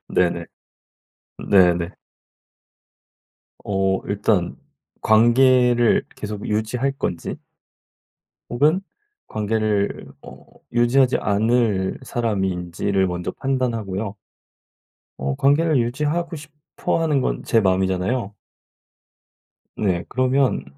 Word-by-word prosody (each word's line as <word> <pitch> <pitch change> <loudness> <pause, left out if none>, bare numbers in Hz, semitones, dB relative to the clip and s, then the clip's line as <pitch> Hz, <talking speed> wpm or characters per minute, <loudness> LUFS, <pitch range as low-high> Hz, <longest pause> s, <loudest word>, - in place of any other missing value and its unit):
네네. - - +1 1.1
네 90 -4 +6
네. 85 +1 -3 1.7
어 95 -1 0
일단 100 -3 0 0.4
관계를 120 +1 +4
계속 105 -1 -6
유지할 115 +6 -1
건지 90 -10 -4 1.1
혹은 150 +9 +2 0.5
관계를 105 -1 -1 0.2
어 - - -13 0.3
유지하지 125 +2 +3
않을 105 0 +1
사람인지를 95 -5 -1
먼저 90 0 -3
판단하고요. 110 -7 -2 1.0
어 70 0 -2
관계를 150 +2 +3
유지하고 150 +8 -2
싶어 150 +2 -4
하는 150 -4 +1
건 - - -2
제 115 - +3
마음이잖아요. 95 +3 0 1.4
네. 90 -5 0
그러면 130 +1 +1
110 Hz, 190 characters per minute, -21 LUFS, 95-130 Hz, 1.7 s, 네